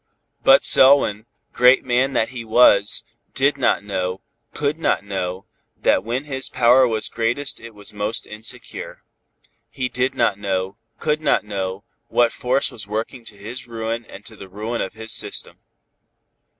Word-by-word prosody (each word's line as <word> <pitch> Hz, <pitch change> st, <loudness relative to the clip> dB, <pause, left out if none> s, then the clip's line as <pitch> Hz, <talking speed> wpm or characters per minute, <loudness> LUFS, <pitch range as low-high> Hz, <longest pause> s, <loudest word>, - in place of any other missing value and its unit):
But 135 Hz, 0 st, +6 dB
Selwyn, 125 Hz, -6 st, +6 dB, 0.3 s
great 125 Hz, +1 st, +5 dB
man 130 Hz, +2 st, +1 dB
that 110 Hz, -, +1 dB
he 125 Hz, -2 st, -7 dB
was, 110 Hz, -3 st, +4 dB, 0.3 s
did 140 Hz, +2 st, +2 dB
not 135 Hz, -6 st, +1 dB
know, 95 Hz, -2 st, -3 dB, 0.3 s
could 150 Hz, +2 st, -2 dB
not 165 Hz, -, 0 dB
know, 95 Hz, -2 st, -4 dB, 0.3 s
that -, -, +2 dB
when 120 Hz, +5 st, -3 dB
his 135 Hz, -3 st, -3 dB
power 125 Hz, +2 st, +4 dB
was 110 Hz, -2 st, -2 dB
greatest 120 Hz, +5 st, -1 dB
it 115 Hz, -1 st, -12 dB
was 105 Hz, 0 st, -9 dB
most 105 Hz, +2 st, -1 dB
insecure. 110 Hz, +1 st, -8 dB, 0.7 s
He 125 Hz, -1 st, -3 dB
did 125 Hz, +1 st, -1 dB
not 100 Hz, -, +1 dB
know, 95 Hz, -1 st, -2 dB, 0.2 s
could 155 Hz, 0 st, -1 dB
not 155 Hz, -, +2 dB
know, 95 Hz, -1 st, -4 dB, 0.2 s
what 120 Hz, -1 st, +2 dB
force 130 Hz, +2 st, 0 dB
was 100 Hz, -3 st, -9 dB
working 110 Hz, +4 st, -4 dB
to 105 Hz, -, -12 dB
his 115 Hz, +5 st, -8 dB
ruin 115 Hz, 0 st, -4 dB
and 100 Hz, 0 st, -13 dB
to -, -, -12 dB
the 95 Hz, -, -12 dB
ruin 110 Hz, +5 st, -4 dB
of 95 Hz, -, -4 dB
his 110 Hz, 0 st, -8 dB
system. -, -, -4 dB
115 Hz, 160 wpm, -21 LUFS, 100-130 Hz, 0.7 s, But